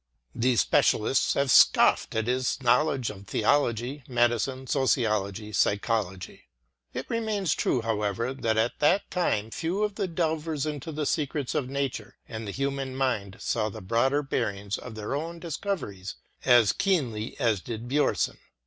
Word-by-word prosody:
The 125 Hz, +1 st, +1 dB
spe -, -, +4 dB
cialists 120 Hz, +5 st, +2 dB
have 140 Hz, -2 st, +1 dB
scoffed -, -, +5 dB
at 110 Hz, -1 st, 0 dB
his 125 Hz, +3 st, 0 dB
knowledge 125 Hz, 0 st, +2 dB
of 100 Hz, -1 st, -12 dB
theology, 125 Hz, +3 st, 0 dB
medicine, 120 Hz, +1 st, +1 dB
sociology, 110 Hz, -6 st, 0 dB
psychology. 100 Hz, -4 st, -1 dB, 0.4 s
It 130 Hz, -, -5 dB
remains 215 Hz, -7 st, 0 dB
true, 120 Hz, -, 0 dB
however, 115 Hz, +2 st, -1 dB
that 115 Hz, -4 st, -1 dB
at 115 Hz, +2 st, 0 dB
that 180 Hz, +7 st, +2 dB
time 115 Hz, -, 0 dB
few 180 Hz, -, -1 dB
of 210 Hz, -1 st, 0 dB
the 200 Hz, -1 st, -2 dB
delvers 160 Hz, -3 st, -1 dB
into 150 Hz, +1 st, -4 dB
the 150 Hz, 0 st, -3 dB
secrets 145 Hz, -2 st, -1 dB
of 130 Hz, -3 st, -1 dB
nature 140 Hz, -1 st, -3 dB
and 110 Hz, -1 st, -6 dB
the -, -, -3 dB
human 135 Hz, +1 st, -3 dB
mind 110 Hz, -8 st, -1 dB
saw 110 Hz, -2 st, 0 dB
the 110 Hz, -, -8 dB
broader 120 Hz, +9 st, +1 dB
bearings 105 Hz, -6 st, -2 dB
of 120 Hz, -3 st, -9 dB
their 110 Hz, +3 st, -4 dB
own 165 Hz, +4 st, -3 dB
discoveries 165 Hz, -, -4 dB, 0.3 s
as 120 Hz, -5 st, +6 dB
keenly 125 Hz, -, -1 dB
as 115 Hz, -7 st, +1 dB
did 115 Hz, +2 st, -6 dB
Bjomson. 145 Hz, +4 st, +1 dB
125 Hz, 150 wpm, -27 LUFS, 110-145 Hz, 0.4 s, as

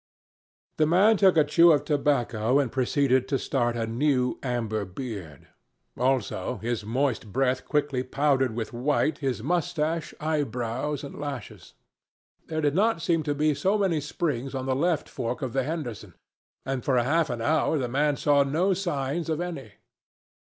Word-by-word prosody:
The 155 Hz, -, +3 dB
man 195 Hz, +7 st, +5 dB
took 190 Hz, -4 st, +4 dB
a 155 Hz, -, +7 dB
chew 165 Hz, +3 st, +5 dB
of 150 Hz, -, +2 dB
tobacco 130 Hz, -5 st, +1 dB
and 135 Hz, -5 st, +1 dB
proceeded 130 Hz, 0 st, +1 dB
to 135 Hz, -, +1 dB
start 120 Hz, -1 st, -1 dB
a 115 Hz, -, -1 dB
new 125 Hz, +2 st, 0 dB
amber 115 Hz, -5 st, -2 dB
beard. 95 Hz, -, -8 dB, 0.5 s
Also, 125 Hz, -7 st, -1 dB
his 115 Hz, -1 st, -3 dB
moist 120 Hz, -1 st, -1 dB
breath 130 Hz, +1 st, 0 dB
quickly 145 Hz, -3 st, 0 dB
powdered 135 Hz, -2 st, +1 dB
with 115 Hz, 0 st, -4 dB
white 145 Hz, +4 st, 0 dB
his 135 Hz, -3 st, -2 dB
moustache, 165 Hz, -2 st, -1 dB
eyebrows, 145 Hz, -2 st, -2 dB
and 140 Hz, -, -8 dB
lashes. 140 Hz, -7 st, -7 dB, 0.7 s
There 155 Hz, -1 st, -2 dB
did 145 Hz, -2 st, +1 dB
not 205 Hz, +1 st, +2 dB
seem 165 Hz, -1 st, +2 dB
to 145 Hz, -1 st, -2 dB
be 150 Hz, +1 st, +2 dB
so 190 Hz, +9 st, +1 dB
many 185 Hz, -7 st, +1 dB
springs 140 Hz, -3 st, -3 dB
on 130 Hz, -1 st, -3 dB
the 130 Hz, -1 st, 0 dB
left 165 Hz, +3 st, 0 dB
fork 125 Hz, 0 st, -4 dB
of 125 Hz, -3 st, -3 dB
the 135 Hz, -, +1 dB
Henderson, 140 Hz, -6 st, -5 dB, 0.5 s
and 135 Hz, -2 st, -3 dB
for 130 Hz, -3 st, +1 dB
half 150 Hz, +6 st, +2 dB
an 120 Hz, -, -3 dB
hour 155 Hz, +3 st, +2 dB
the 130 Hz, -3 st, -1 dB
man 145 Hz, +3 st, +1 dB
saw 145 Hz, -1 st, +3 dB
no 160 Hz, +8 st, +1 dB
signs 165 Hz, -3 st, -2 dB
of 160 Hz, 0 st, -1 dB
any. 165 Hz, -12 st, -5 dB
140 Hz, 165 wpm, -26 LUFS, 125-155 Hz, 0.7 s, a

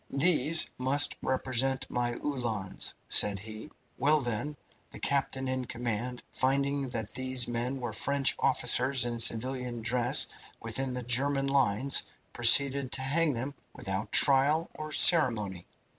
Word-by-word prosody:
"These 160 Hz, +2 st, +1 dB
must 140 Hz, +3 st, +2 dB
represent 130 Hz, 0 st, -1 dB
my 120 Hz, 0 st, -3 dB
Uhlans," 115 Hz, -10 st, -4 dB
said 100 Hz, -1 st, +4 dB
he. 110 Hz, +6 st, -9 dB, 0.3 s
"Well, 150 Hz, +2 st, +2 dB
then, 125 Hz, +5 st, -4 dB, 0.3 s
the -, -, -12 dB
captain 135 Hz, -1 st, -2 dB
in 130 Hz, -1 st, -3 dB
command, 120 Hz, +1 st, -5 dB
finding 140 Hz, +1 st, -1 dB
that 110 Hz, -3 st, -5 dB
these 130 Hz, -1 st, -1 dB
men 120 Hz, +3 st, -4 dB
were 120 Hz, -3 st, -5 dB
French 140 Hz, +4 st, 0 dB
soldiers 130 Hz, 0 st, +2 dB
in 120 Hz, -1 st, -4 dB
civilian 120 Hz, +1 st, +1 dB
dress 120 Hz, +1 st, +2 dB, 0.3 s
within 125 Hz, +3 st, -4 dB
the 125 Hz, -, -5 dB
German 135 Hz, +3 st, +2 dB
lines, 135 Hz, -1 st, +2 dB, 0.3 s
proceeded 135 Hz, +2 st, +4 dB
to 130 Hz, -, +1 dB
hang 150 Hz, +3 st, 0 dB
them 130 Hz, +4 st, -5 dB, 0.2 s
without 95 Hz, +2 st, -4 dB
trial 145 Hz, +4 st, +4 dB
or 155 Hz, 0 st, -8 dB
ceremony. 115 Hz, -, +3 dB
130 Hz, 130 wpm, -28 LUFS, 120-140 Hz, 0.3 s, said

